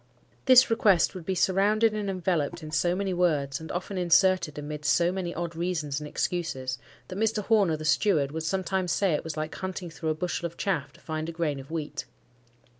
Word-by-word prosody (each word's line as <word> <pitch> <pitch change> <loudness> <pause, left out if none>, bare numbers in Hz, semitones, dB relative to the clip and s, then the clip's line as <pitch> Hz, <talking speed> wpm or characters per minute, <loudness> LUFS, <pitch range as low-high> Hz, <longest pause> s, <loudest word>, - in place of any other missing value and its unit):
This 255 -1 +7
request 200 -6 +4
would 180 -4 -9
be 190 - 0
surrounded 205 +5 +3
and 210 -2 -2
enveloped 175 -3 -1
in 155 - -7
so 175 +3 +1
many 195 0 -1
words, 150 -6 +1
and 160 - -7
often 185 +2 -3
inserted 180 -3 +3
amidst 150 -1 -2
so 170 +4 +3
many 185 -2 -3
odd 170 -1 -4
reasons 160 -5 -2
and 150 - -7
excuses, 145 -7 -2 0.3
that 185 +1 -5
Mr. 220 -1 +1
Horner 200 -8 +3
(the 155 - -7
steward) 150 -2 +2
would 160 +1 -4
sometimes 185 +1 -1
say 195 -5 +2
it 150 - -1
was 160 -1 -5
like 155 0 -3
hunting 185 -2 -5
through 160 0 -4
a 155 - +1
bushel 175 +1 -2
of 170 - -15
chaff 165 -8 -1
to - - -19
find 155 0 -4
a - - -3
grain 160 -4 -2
of 135 - -11
wheat. 150 -2 -4
170 Hz, 205 wpm, -27 LUFS, 155-190 Hz, 0.3 s, This